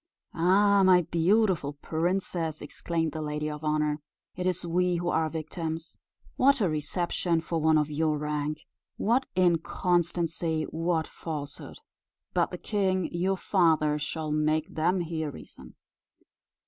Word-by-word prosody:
"Ah! 200 Hz, +4 st, +4 dB
my 185 Hz, -2 st, +6 dB
beautiful 170 Hz, -2 st, +2 dB
princess," 165 Hz, +1 st, -2 dB
exclaimed 165 Hz, +2 st, -2 dB
the 155 Hz, -, -5 dB
lady 150 Hz, 0 st, -3 dB
of 150 Hz, 0 st, -6 dB
honour, 150 Hz, -1 st, 0 dB, 0.3 s
"it 180 Hz, 0 st, -2 dB
is 180 Hz, -1 st, -1 dB
we 180 Hz, +1 st, +1 dB
who 175 Hz, 0 st, -1 dB
are 160 Hz, -1 st, +1 dB
victims. 160 Hz, +1 st, -5 dB, 0.4 s
What 275 Hz, +1 st, +4 dB
a 200 Hz, -, +2 dB
reception 165 Hz, +2 st, 0 dB
for 165 Hz, 0 st, -2 dB
one 160 Hz, 0 st, +4 dB
of 150 Hz, 0 st, 0 dB
your 155 Hz, 0 st, +1 dB
rank! 150 Hz, 0 st, -2 dB, 0.4 s
what 245 Hz, +5 st, +1 dB
inconstancy 170 Hz, -2 st, +1 dB
what 165 Hz, 0 st, -1 dB
falsehood! 150 Hz, -3 st, -7 dB, 0.6 s
But -, -, +2 dB
the -, -, -6 dB
king 190 Hz, -4 st, -1 dB
your 185 Hz, +3 st, 0 dB
father 160 Hz, -6 st, +2 dB
shall 155 Hz, +1 st, -3 dB
make 155 Hz, +3 st, 0 dB
them 180 Hz, +4 st, +1 dB
hear 160 Hz, -2 st, -3 dB
reason." 75 Hz, -, -12 dB
165 Hz, 135 wpm, -28 LUFS, 155-180 Hz, 0.6 s, my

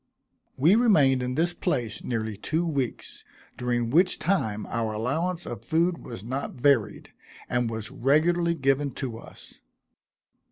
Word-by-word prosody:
We 155 Hz, +8 st, +5 dB
remained 150 Hz, -, +4 dB
in 125 Hz, 0 st, -2 dB
this 170 Hz, +3 st, +1 dB
place 120 Hz, -, -2 dB
nearly 110 Hz, -3 st, -2 dB
two 160 Hz, -, -1 dB
weeks, 140 Hz, -7 st, -3 dB, 0.3 s
during 120 Hz, -1 st, -1 dB
which 180 Hz, +5 st, +4 dB
time 110 Hz, -, -1 dB
our 115 Hz, -2 st, -2 dB
allowance 160 Hz, +11 st, -2 dB
of 120 Hz, -4 st, -7 dB
food 170 Hz, +2 st, +1 dB
was 115 Hz, -5 st, -8 dB
not 130 Hz, +5 st, -4 dB
varied, 120 Hz, -6 st, +1 dB, 0.3 s
and 120 Hz, -1 st, 0 dB
was 110 Hz, -1 st, -5 dB
regularly 170 Hz, +6 st, +2 dB
given 135 Hz, -2 st, 0 dB
to 120 Hz, -4 st, -5 dB
us. -, -, -14 dB
135 Hz, 135 wpm, -26 LUFS, 115-165 Hz, 0.3 s, We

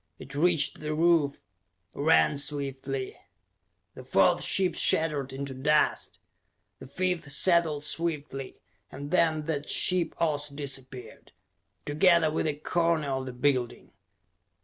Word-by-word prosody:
It 135 Hz, -, -12 dB
reached 160 Hz, 0 st, +1 dB
the 155 Hz, 0 st, -3 dB
roof, 160 Hz, -3 st, +2 dB, 0.5 s
ran 150 Hz, 0 st, +3 dB
swiftly.... 135 Hz, -2 st, -3 dB, 0.8 s
The -, -, -11 dB
fourth -, -, +3 dB
ship 185 Hz, -3 st, +1 dB
shattered 150 Hz, -5 st, +1 dB
into 135 Hz, 0 st, -6 dB
dust. 150 Hz, +4 st, 0 dB, 0.6 s
The -, -, -11 dB
fifth 180 Hz, 0 st, -3 dB
settled 160 Hz, -1 st, +2 dB
swiftly 150 Hz, -4 st, -3 dB, 0.3 s
and 145 Hz, +2 st, -8 dB
then 160 Hz, -4 st, +2 dB
that 150 Hz, -2 st, -3 dB
ship 180 Hz, -3 st, +1 dB
also 150 Hz, -3 st, -2 dB
disappeared, 130 Hz, -5 st, -6 dB, 0.5 s
together 160 Hz, +1 st, +3 dB
with 155 Hz, -, -1 dB
a 150 Hz, -, -1 dB
corner 165 Hz, -1 st, 0 dB
of 130 Hz, 0 st, -3 dB
the 130 Hz, -, -6 dB
building. 125 Hz, -1 st, -1 dB
150 Hz, 120 wpm, -27 LUFS, 140-165 Hz, 0.8 s, ran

